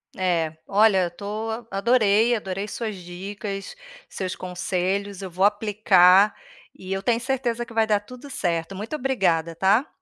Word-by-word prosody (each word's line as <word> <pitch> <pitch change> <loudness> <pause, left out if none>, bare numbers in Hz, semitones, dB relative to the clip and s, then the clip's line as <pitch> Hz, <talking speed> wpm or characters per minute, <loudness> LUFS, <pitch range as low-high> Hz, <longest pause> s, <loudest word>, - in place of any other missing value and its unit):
É, 170 -4 0
olha 205 -1 +4
eu - - 0
estou 220 +5 -5
adorei, 220 +1 +3
adorei 195 -1 -4
suas 220 -1 -4
dicas, 195 - -7 0.3
seus 185 -1 -4
conselhos, 185 +2 -2
eu 190 - -6
vou 180 +2 -1
aplicar, 205 -2 +5 0.4
e 185 0 -6
eu 195 0 -3
tenho 230 +2 +2
certeza 240 -2 -2
que 235 - -13
vai 225 -1 +3
dar 210 -2 +2
tudo 250 +7 -12
certo, 170 -6 -2
muito 215 +9 -5
obrigada, 190 - 0
tá. 200 - +3
200 Hz, 150 wpm, -24 LUFS, 185-225 Hz, 0.4 s, aplicar